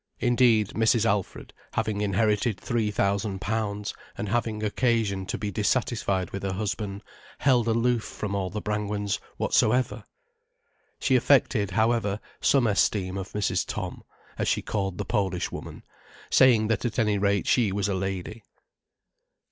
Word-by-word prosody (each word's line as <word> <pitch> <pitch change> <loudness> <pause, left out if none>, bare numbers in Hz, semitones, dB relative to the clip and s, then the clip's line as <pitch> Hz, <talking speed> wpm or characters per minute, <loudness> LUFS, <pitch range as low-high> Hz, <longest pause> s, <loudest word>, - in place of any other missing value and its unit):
Indeed, 120 -4 +3
Mrs. 115 +1 +2
Alfred, 100 -3 -2 0.2
having 110 -2 -1
inherited 105 +1 +1
three 115 -3 -1
thousand 100 -1 0
pounds, 105 -1 -2 0.2
and 105 - -3
having 110 -2 -1
occasion 105 -4 0
to - - -2
be 105 -1 -3
dissatisfied 105 -3 0
with 100 - -5
her 95 -1 -2
husband, 100 0 -3 0.3
held 125 -4 +3
aloof 115 0 +2
from 100 -2 -5
all 95 -2 -1
the 105 +3 -5
Brangwens 105 -1 -2 0.2
whatsoever. 125 +4 +1 1.0
She 130 - +2
affected, 125 -5 +3
however, 110 0 +1 0.2
some 135 -3 +4
esteem 100 -3 +1
of 95 -1 -6
Mrs. 105 -1 0
Tom, - - -5 0.4
as - - 0
she - - +1
called 95 -3 -2
the - - -3
Polish 95 -5 -1
woman, - - -8 0.5
saying 120 -5 +5
that 115 - 0
at 120 -3 -2
any 105 -3 +2
rate 100 0 +1
she 115 -6 +3
was 100 0 0
a 100 - 0
lady. 95 +3 -4
105 Hz, 145 wpm, -26 LUFS, 100-115 Hz, 1.0 s, saying